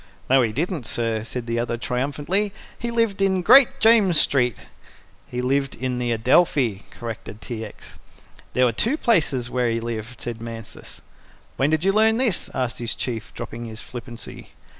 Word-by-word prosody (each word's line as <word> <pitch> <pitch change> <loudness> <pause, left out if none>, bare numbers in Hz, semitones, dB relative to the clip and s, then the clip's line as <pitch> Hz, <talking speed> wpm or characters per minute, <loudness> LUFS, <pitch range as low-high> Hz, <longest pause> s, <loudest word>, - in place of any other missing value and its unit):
"No, 135 - +7
we 115 -3 +1
didn't, 150 - -2
sir," 115 -2 +1
said 120 +1 -5
the 115 0 -1
other 120 0 -1
triumphantly. 145 - -1 0.2
"He 235 - -4
lived 230 -4 0
in 190 -2 +2
Great 270 +5 +7
James 215 -8 +5
Street." 125 -6 +2 0.7
"He 125 0 -4
lived 135 +1 0
in 125 -1 -2
the 120 -1 -1
Adelphi," 120 - +2
corrected 115 -2 -7
T. 115 -1 -6
X. 105 - -11 0.5
"There 125 - +4
were 120 - +3
two 230 - 0
places 150 - +1
where 125 -2 +1
he 115 0 0
lived," 115 +1 -5
said 115 -2 -5
Mansus. 115 -2 -9 0.5
"When 135 - +2
did 155 +1 +1
you 195 - +4
learn 220 +2 +4
this?" 235 -8 +1
asked 125 -1 -2
his 120 -1 -3
Chief, 115 -3 -4
dropping 120 +1 -6
his 110 -1 -8
flippancy. 120 -1 -9
125 Hz, 170 wpm, -23 LUFS, 115-180 Hz, 0.7 s, No